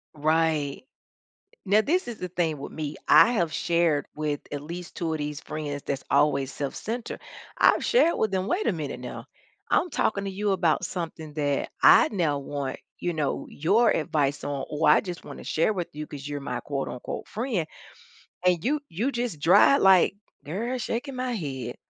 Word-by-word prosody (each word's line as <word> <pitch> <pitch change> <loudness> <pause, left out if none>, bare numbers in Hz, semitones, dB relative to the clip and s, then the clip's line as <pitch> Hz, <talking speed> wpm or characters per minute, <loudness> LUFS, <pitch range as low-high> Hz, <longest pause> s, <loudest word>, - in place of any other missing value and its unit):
Right. 155 - +1 0.8
Now 205 +3 +5
this 340 +8 +1
is 235 - -6
the 180 - -4
thing 165 -4 -1
with - - -8
me, 155 -1 -5
I 240 - +7
have 170 -8 0
shared 170 -4 +1
with 150 -1 -2
at 145 - -3
least 170 +4 -8
2 165 -2 -2
of - - -3
these 150 0 -4
friends 145 -2 -5
that's 135 -1 -4
always 140 -2 +2
self-centered. 220 - -4 0.4
I've - - +4
shared 470 -9 +3
with 220 - +1
them, 190 0 -1
"Wait 370 - 0
a - - +3
minute 150 -6 -5
now. 125 - -7 0.5
I'm 360 - +3
talking 200 -6 0
to 195 - -3
you 205 +2 -1
about 175 -2 +1
something 160 -4 -5
that 145 -2 -1
I 315 - +8
now 160 -7 +1
want, 140 -1 -4 0.2
you 175 -1 -1
know, 150 -3 -2
your 205 +10 +3
advice 150 -2 0
on 140 -2 -3
or 150 0 +1
I - - +6
just 180 -3 -7
wanna - - -9
share 165 +7 +1
with 180 -4 -3
you 150 0 -5
'cause 145 0 -8
you're 145 -1 -4
my 140 - -4
quote, 140 -2 -3
unquote, 125 - -6
'friend.'" 220 - -2 0.8
And 180 -2 +3
you 295 +3 +2
you 220 +12 -1
just 240 - -3
dry 180 - +6
like, 190 -3 +5 0.3
"Girl, 225 - -3
shaking 250 +4 -3
my 255 0 -2
head. 135 - -4
165 Hz, 185 wpm, -26 LUFS, 145-205 Hz, 0.8 s, I